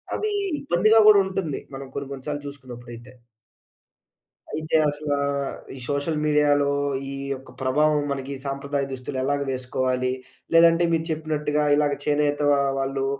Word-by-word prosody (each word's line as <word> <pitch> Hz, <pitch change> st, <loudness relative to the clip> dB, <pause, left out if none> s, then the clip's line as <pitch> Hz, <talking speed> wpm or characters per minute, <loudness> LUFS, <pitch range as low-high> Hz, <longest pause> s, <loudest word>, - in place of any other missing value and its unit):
అదీ 430 Hz, 0 st, -1 dB, 0.3 s
ఇబ్బందిగా 215 Hz, -1 st, +4 dB
గూడా 205 Hz, -1 st, +8 dB
ఉంటుంది. 185 Hz, -7 st, -3 dB
మనం 135 Hz, 0 st, -7 dB
కొన్ని 140 Hz, -1 st, -4 dB
కొన్ని 130 Hz, -1 st, -9 dB
సార్లు 145 Hz, -1 st, -4 dB
చూసుకున్నప్పుడైతే. 120 Hz, -3 st, -10 dB, 1.4 s
అయితే 155 Hz, +1 st, 0 dB
అసలా, 145 Hz, 0 st, -2 dB, 0.6 s
ఈ -, -, -10 dB
సోషల్ 145 Hz, +2 st, -1 dB
మీడియాలో 145 Hz, -1 st, +3 dB, 0.4 s
ఈ -, -, -5 dB, 0.2 s
యొక్క 135 Hz, 0 st, -10 dB
ప్రభావం 150 Hz, +3 st, +2 dB
మనకి 135 Hz, 0 st, -4 dB
సాంప్రదాయ 140 Hz, 0 st, -2 dB
దుస్తులు 130 Hz, +1 st, -5 dB
ఎలాగ 145 Hz, +1 st, 0 dB
వేసుకోవాలి? 130 Hz, 0 st, -1 dB, 0.4 s
లేదంటే 165 Hz, +1 st, +6 dB
మీరు 165 Hz, -1 st, +1 dB
చెప్పినట్టుగా 150 Hz, -1 st, -1 dB
ఇలాగ 145 Hz, -1 st, +2 dB
చేనేత 145 Hz, 0 st, +1 dB, 0.2 s
ఆహ్, 140 Hz, 0 st, +1 dB
వాళ్ళు 135 Hz, 0 st, -1 dB
145 Hz, 130 wpm, -24 LUFS, 135-155 Hz, 1.4 s, గూడా